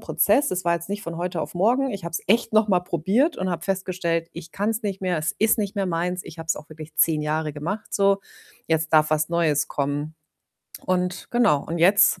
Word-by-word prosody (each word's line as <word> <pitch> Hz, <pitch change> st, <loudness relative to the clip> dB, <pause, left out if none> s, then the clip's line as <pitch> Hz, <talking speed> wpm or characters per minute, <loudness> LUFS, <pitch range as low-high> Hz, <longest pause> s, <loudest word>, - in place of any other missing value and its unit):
Prozess. 285 Hz, -, +2 dB
Es 185 Hz, 0 st, -2 dB
war 170 Hz, -, +3 dB
jetzt 170 Hz, +1 st, -5 dB
nicht 205 Hz, 0 st, -3 dB
von 170 Hz, 0 st, -6 dB
heute 175 Hz, -1 st, -2 dB
auf -, -, -7 dB
morgen. 245 Hz, +9 st, +2 dB
Ich 195 Hz, -4 st, -6 dB
habe 170 Hz, -, -5 dB
es -, -, -3 dB
echt 225 Hz, +3 st, +2 dB
noch 215 Hz, 0 st, +4 dB
mal 185 Hz, -3 st, +3 dB
probiert 190 Hz, -, +1 dB
und 185 Hz, 0 st, -1 dB
habe 170 Hz, -1 st, -4 dB
festgestellt, 185 Hz, -3 st, -1 dB
ich 170 Hz, 0 st, -10 dB
kann's 220 Hz, +3 st, -1 dB
nicht 195 Hz, -2 st, -3 dB
mehr. 180 Hz, -3 st, 0 dB
Es 155 Hz, +2 st, -1 dB
ist 220 Hz, +2 st, +3 dB
nicht 205 Hz, 0 st, -2 dB
mehr 195 Hz, -, 0 dB
meins. 180 Hz, +1 st, -2 dB
Ich 160 Hz, -, -11 dB
hab's 165 Hz, 0 st, -1 dB
auch 155 Hz, -, -10 dB
wirklich 155 Hz, 0 st, -10 dB
10 155 Hz, -1 st, +3 dB
Jahre 155 Hz, 0 st, -1 dB
gemacht 175 Hz, +10 st, -5 dB
so. 200 Hz, -1 st, +3 dB, 0.5 s
Jetzt 160 Hz, 0 st, 0 dB
darf 155 Hz, -1 st, +5 dB
was 155 Hz, 0 st, +1 dB
Neues 160 Hz, -4 st, +1 dB
kommen. 145 Hz, +2 st, -2 dB, 0.7 s
Und 180 Hz, 0 st, -1 dB
genau, 230 Hz, -12 st, +3 dB
und 170 Hz, +1 st, -3 dB
jetzt, 185 Hz, +1 st, +5 dB
175 Hz, 220 wpm, -24 LUFS, 160-200 Hz, 0.7 s, darf